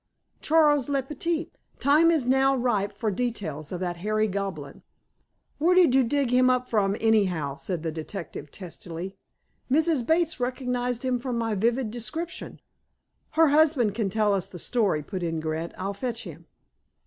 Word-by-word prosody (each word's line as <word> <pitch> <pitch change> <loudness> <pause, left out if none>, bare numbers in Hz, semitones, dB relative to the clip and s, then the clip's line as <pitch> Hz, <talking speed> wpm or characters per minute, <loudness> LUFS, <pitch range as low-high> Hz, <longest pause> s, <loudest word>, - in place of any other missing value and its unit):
Charles 295 -4 +3
le 275 -2 +1
Petit, 320 +4 -3 0.3
time 300 +4 +4
is 315 -7 +2
now 265 +1 +3
ripe 235 -6 0
for 220 -2 -2
details 185 -10 -3
of 180 - -4
that 175 -1 -2
hairy 215 +4 0
goblin." 195 -7 -5 0.8
"Where 345 +4 +4
did 355 -8 +6
you 265 0 +5
dig 270 +1 0
him 255 0 +5
up 250 0 +1
from, 200 -3 +1
anyhow?" 185 -11 +1
said 175 -4 -4
the 165 - -2
detective 160 -2 -7
testily. 180 +1 -7 0.5
"Mrs. 310 -1 +2
Bates 320 +3 +1
recognized 250 -1 -2
him 250 -1 +1
from 250 -1 -3
my 225 -1 -1
vivid 230 +3 0
description." 320 +9 -5 0.7
"Her 320 -1 +5
husband 290 -8 +3
can 210 -2 -1
tell 210 +1 +2
us 195 -2 -1
the 180 - -10
story," 195 -6 0
put 185 +4 -5
in 165 -2 -2
Grant. 160 +1 -3
"I'll 195 +2 -3
fetch 235 +2 -4
him." 165 -3 -11
230 Hz, 160 wpm, -26 LUFS, 190-270 Hz, 0.8 s, did